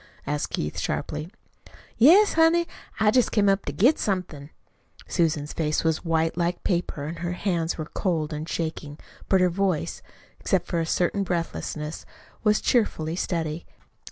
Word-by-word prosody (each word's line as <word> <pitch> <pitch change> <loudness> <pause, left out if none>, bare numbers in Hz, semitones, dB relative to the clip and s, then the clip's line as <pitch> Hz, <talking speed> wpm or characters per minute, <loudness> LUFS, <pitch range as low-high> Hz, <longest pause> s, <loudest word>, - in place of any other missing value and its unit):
asked 150 0 -2
Keith 75 - -2
sharply. 155 +2 -3 0.7
"Yes, 360 - +6
honey. 330 +1 +4 0.3
I 215 -1 +4
jest 250 +1 +3
came 205 -2 +3
up 195 0 +2
to - - -2
get 230 - +3
somethin'." 180 -8 -3 0.6
Susan's 155 -4 0
face 155 -2 0
was 160 -1 0
white 165 -1 +1
like 175 +1 -1
paper, 170 -5 -1
and 165 +2 -6
her 175 +1 -2
hands 175 -3 -1
were 155 - -4
cold 160 -3 -2
and 150 +2 -5
shaking, 155 -3 -4 0.3
but 190 -1 +4
her 180 - +4
voice, 185 -3 -1 0.4
except - - 0
for 170 - -1
a 165 - -1
certain 180 +4 +1
breathlessness, 165 -4 -3 0.4
was 210 -1 +3
cheerfully 165 -9 +1
steady. 165 -3 -3
170 Hz, 155 wpm, -25 LUFS, 155-195 Hz, 0.7 s, Yes